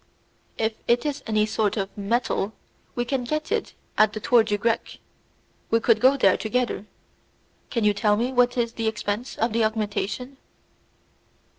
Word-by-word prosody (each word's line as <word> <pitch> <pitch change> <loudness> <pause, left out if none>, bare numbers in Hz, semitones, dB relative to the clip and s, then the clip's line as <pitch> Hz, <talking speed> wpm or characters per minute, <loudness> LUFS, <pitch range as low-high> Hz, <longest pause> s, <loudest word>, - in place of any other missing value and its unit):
"If 220 0 0
it 240 +4 +2
is 290 -1 -2
any 215 -1 +2
sort 215 0 0
of 195 -1 -3
metal, 210 0 -1 0.4
we 240 - -1
can 260 0 -1
get 305 +7 -3
it 455 - -1 0.2
at 215 0 +5
the 215 - -4
Tour 240 +2 +4
du 210 -2 -1
Grec. 230 +2 -1 0.7
We 230 - +3
could 225 -1 +3
go 265 +2 +5
there 195 -8 +4
together. 230 -2 -2 0.8
Can 230 -3 -1
you 210 0 +4
tell 210 0 +2
me 245 +4 -1
what 245 0 +3
is 235 -1 0
the 225 -1 -2
expense 220 +2 -3
of 225 0 0
the 230 0 +2
augmentation?" 220 +4 -2
225 Hz, 165 wpm, -24 LUFS, 215-245 Hz, 0.8 s, at